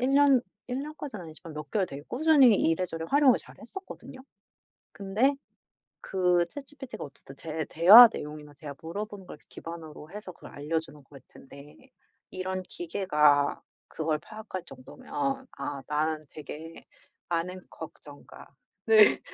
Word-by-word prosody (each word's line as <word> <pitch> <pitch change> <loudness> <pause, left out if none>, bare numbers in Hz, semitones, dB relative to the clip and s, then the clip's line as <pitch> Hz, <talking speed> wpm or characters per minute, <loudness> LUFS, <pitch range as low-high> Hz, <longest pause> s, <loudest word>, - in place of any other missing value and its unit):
1 260 +2 +1
년? 280 -2 +6 0.3
1 255 +2 -3
년까지는 290 - -7
아니지만 160 +1 -11
몇 150 -1 -7
개월 195 -3 +1
되게 140 +1 -8
꾸준히 275 -4 +5
이래저래 165 0 0
활용을 280 -3 +5
잘 - - -12
했었거든요? 385 -8 -10 0.7
근데 210 +8 +1 0.7
그 180 -2 +2
ChatGPT가 275 -5 -9
어쨌든 135 -1 -12
제 155 +1 -4
대화 205 +9 +10
내용이나 150 0 -8
제가 145 -1 -9
물어보는 200 +4 -6
걸 - - -10
기반으로 160 -1 -9
해서 205 -2 -8
그걸 - - -14
알려주는 150 +1 -4
것 - - -38
같은데 140 - -15 0.4
이런 185 0 -4
기계가 150 -6 +1 0.3
그걸 155 -1 -2
파악할 215 0 -8
정도면 265 - -5
'아 140 - -4
나는 155 0 -1
되게 155 +2 -10 0.4
많은 180 +2 -2
걱정과' 145 -2 -12 0.4
네. 435 -1 +6
180 Hz, 305 characters per minute, -28 LUFS, 155-245 Hz, 0.7 s, 대화